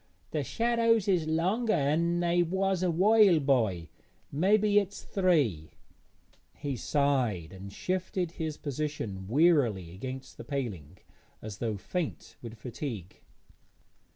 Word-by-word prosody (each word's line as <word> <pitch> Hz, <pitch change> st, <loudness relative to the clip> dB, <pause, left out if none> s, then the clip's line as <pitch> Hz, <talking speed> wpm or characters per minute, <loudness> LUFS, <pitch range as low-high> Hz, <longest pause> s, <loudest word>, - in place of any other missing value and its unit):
'The 150 Hz, -2 st, -1 dB
shadows 230 Hz, -, +2 dB
is 175 Hz, -5 st, +2 dB
longer 190 Hz, +9 st, +1 dB
'an 170 Hz, +3 st, +1 dB
they 175 Hz, 0 st, +2 dB
was 190 Hz, +2 st, 0 dB
a 185 Hz, -, +2 dB
while 195 Hz, +1 st, +5 dB
by; 110 Hz, -, +1 dB, 0.4 s
mebbe 195 Hz, +8 st, +3 dB
it's 205 Hz, -1 st, +1 dB
three.' 145 Hz, -, +1 dB, 0.9 s
He 140 Hz, -2 st, -4 dB
sighed 120 Hz, -, 0 dB
and 95 Hz, +1 st, -9 dB
shifted 180 Hz, -, -2 dB
his 160 Hz, -3 st, -4 dB
position 140 Hz, -10 st, -4 dB
wearily 120 Hz, -, +2 dB
against 130 Hz, +6 st, -7 dB
the -, -, -8 dB
paling, 95 Hz, -, -5 dB, 0.4 s
as 110 Hz, -1 st, -8 dB
though 110 Hz, -3 st, -2 dB
faint 165 Hz, -, -4 dB
with 115 Hz, -1 st, -9 dB
fatigue. 115 Hz, -, -7 dB
150 Hz, 120 wpm, -29 LUFS, 110-180 Hz, 0.9 s, while